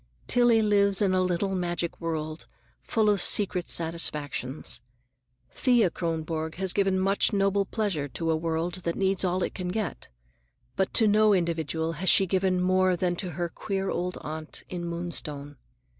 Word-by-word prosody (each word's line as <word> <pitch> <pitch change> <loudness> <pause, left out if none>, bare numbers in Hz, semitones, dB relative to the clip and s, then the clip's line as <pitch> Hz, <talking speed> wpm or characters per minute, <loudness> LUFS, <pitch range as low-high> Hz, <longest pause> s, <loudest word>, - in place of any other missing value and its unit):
Tillie 240 -2 +4
lives 200 -2 +3
in 195 -2 +2
a 185 - +2
little 185 +2 0
magic 175 -2 -3
world, 155 -1 -4 0.3
full 220 -2 0
of 205 -3 +4
secret 185 -3 +3
satisfactions. 150 -6 -1 0.7
Thea 240 -8 +2
Kronborg 160 -1 -3
has 190 0 -1
given 195 -1 +1
much 195 +1 +2
noble 195 -1 +1
pleasure 195 -10 -2
to 165 +5 -2
a - - +2
world 165 +2 -2
that 170 -1 -2
needs 195 -1 +1
all 180 0 0
it - - -3
can 185 -2 -5
get, 195 0 -4 0.7
but 190 - 0
to 225 - +5
no 210 0 +4
individual 165 -2 -1
has 175 +4 -1
she 195 - +6
given 185 0 +1
more 185 0 +2
than 175 0 -1
to 185 - -4
her 175 -1 -2
queer 195 +2 -3
old 180 +1 -3
aunt 155 0 -6
in 175 -1 -5
Moonstone. 150 -4 -4
180 Hz, 160 wpm, -27 LUFS, 165-195 Hz, 0.7 s, she